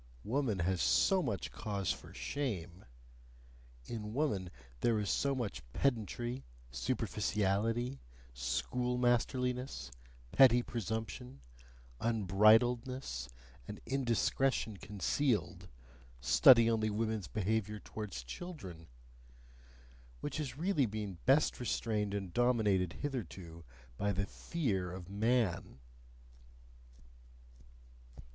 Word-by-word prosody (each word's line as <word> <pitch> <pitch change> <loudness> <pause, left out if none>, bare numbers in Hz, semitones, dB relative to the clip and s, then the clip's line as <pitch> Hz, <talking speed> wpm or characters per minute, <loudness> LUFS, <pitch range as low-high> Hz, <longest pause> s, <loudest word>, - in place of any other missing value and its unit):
Woman 120 -3 0
has 90 0 0
so 65 - +4
much 110 - -3
cause 100 -4 -2
for - - -7
shame; 95 - -4 1.0
in 105 - -5
woman 105 - 0 0.3
there 115 -2 +2
is 105 -2 0
so 140 -1 +1
much 110 -9 -3
pedantry, 120 - -1 0.3
superficiality, 105 - 0 0.3
schoolmasterliness, 125 - 0 0.4
petty 125 -2 +6
presumption, 110 - -4 0.6
unbridledness, 110 - +3 0.4
and - - -7
indiscretion 125 -2 +1
concealed 105 +6 -1 0.5
study 115 - +7
only 110 -1 +2
woman's 110 -1 -1
behaviour 105 0 -1
towards 100 - -6
children! 90 - -8 1.3
which - - -4
has 140 -4 -4
really 160 -6 +2
been 105 -4 -5
best 140 +3 +4
restrained 105 -3 -1
and 95 -4 -4
dominated 105 -8 +2
hitherto 90 - -5 0.3
by 105 - +1
the 100 +1 -1
FEAR 100 - -2
of 90 0 -8
man. 110 - +1
110 Hz, 90 wpm, -34 LUFS, 95-125 Hz, 1.3 s, study